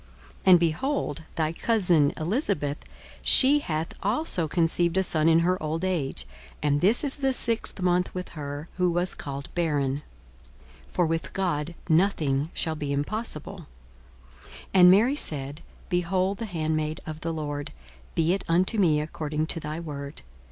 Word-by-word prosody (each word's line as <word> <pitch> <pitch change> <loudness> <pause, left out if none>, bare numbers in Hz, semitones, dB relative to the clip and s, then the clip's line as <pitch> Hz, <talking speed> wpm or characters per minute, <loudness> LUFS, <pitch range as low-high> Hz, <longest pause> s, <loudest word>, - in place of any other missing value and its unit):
42:001:036 - - -24 0.2
And, 180 -2 +8
behold, 170 - -1
thy 155 -1 0
cousin 175 -7 +2
Elisabeth, 160 - 0 0.4
she 280 +3 +6
hath 160 - -3
also 205 - 0
conceived 170 +2 +1
a 190 - +3
son 160 -3 +2
in 165 0 +5
her 180 +2 +1
old 160 +3 -2
age: 170 -8 -2 0.4
and 145 0 +2
this 215 +10 +4
is 280 -1 0
the 270 -1 +1
sixth 230 -4 0
month 180 0 +1
with 180 0 -5
her, 145 0 -6
who 180 -1 +2
was 175 +1 -1
called 140 -1 -7
barren. 145 -5 0 0.9
42:001:037 - - -24
For 175 - +2
with 165 0 -2
God 170 -3 -2
nothing 160 -5 +2
shall 160 - 0
be 150 -2 -4
impossible. 155 +4 -4 0.8
42:001:038 - - -18 0.3
And 180 -2 +8
Mary 225 +9 +5
said, 145 - -2 0.3
Behold 185 +2 0
the 230 - -3
handmaid 155 -3 -2
of 155 0 -7
the 165 - -2
Lord; 145 -2 -4 0.4
be 165 +2 +2
it 195 - -2
unto 185 +6 +2
me 160 -6 +4
according 155 0 -3
to 165 - -1
thy 155 +1 -5
word. 145 -3 -7
165 Hz, 160 wpm, -26 LUFS, 150-185 Hz, 0.9 s, And